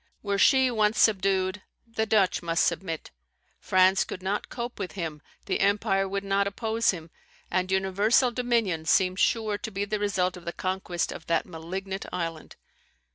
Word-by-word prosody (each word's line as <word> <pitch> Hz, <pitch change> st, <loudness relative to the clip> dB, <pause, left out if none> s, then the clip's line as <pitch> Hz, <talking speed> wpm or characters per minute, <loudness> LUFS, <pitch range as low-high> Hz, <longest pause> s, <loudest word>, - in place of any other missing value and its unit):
Were 200 Hz, -1 st, -1 dB
she 265 Hz, +1 st, +5 dB
once 215 Hz, -1 st, +1 dB
subdued, 190 Hz, -1 st, +2 dB, 0.2 s
the 225 Hz, -1 st, -2 dB
Dutch 205 Hz, -4 st, +2 dB
must 170 Hz, -1 st, +1 dB
submit; 165 Hz, -4 st, -3 dB, 0.5 s
France 185 Hz, +1 st, +4 dB
could 185 Hz, -, -8 dB
not 200 Hz, +2 st, -2 dB
cope 240 Hz, -1 st, -6 dB
with 190 Hz, -3 st, -4 dB
him, 160 Hz, -5 st, -5 dB, 0.2 s
the -, -, -1 dB
empire 200 Hz, -1 st, +2 dB
would 200 Hz, +1 st, -2 dB
not 200 Hz, 0 st, +1 dB
oppose 225 Hz, +3 st, 0 dB
him; 165 Hz, -3 st, -2 dB, 0.4 s
and 185 Hz, +1 st, 0 dB
universal 200 Hz, +6 st, +3 dB
dominion 230 Hz, -9 st, 0 dB
seemed 185 Hz, +3 st, +2 dB
sure 215 Hz, -3 st, +1 dB
to 220 Hz, -, -5 dB
be 200 Hz, -1 st, -2 dB
the 210 Hz, +1 st, -2 dB
result 190 Hz, -3 st, 0 dB
of 180 Hz, -, -12 dB
the 170 Hz, -, -4 dB
conquest 185 Hz, -2 st, -2 dB
of -, -, -9 dB
that 165 Hz, -1 st, +1 dB
malignant 190 Hz, +3 st, -6 dB
island. 165 Hz, -3 st, -5 dB
195 Hz, 165 wpm, -27 LUFS, 185-210 Hz, 0.5 s, she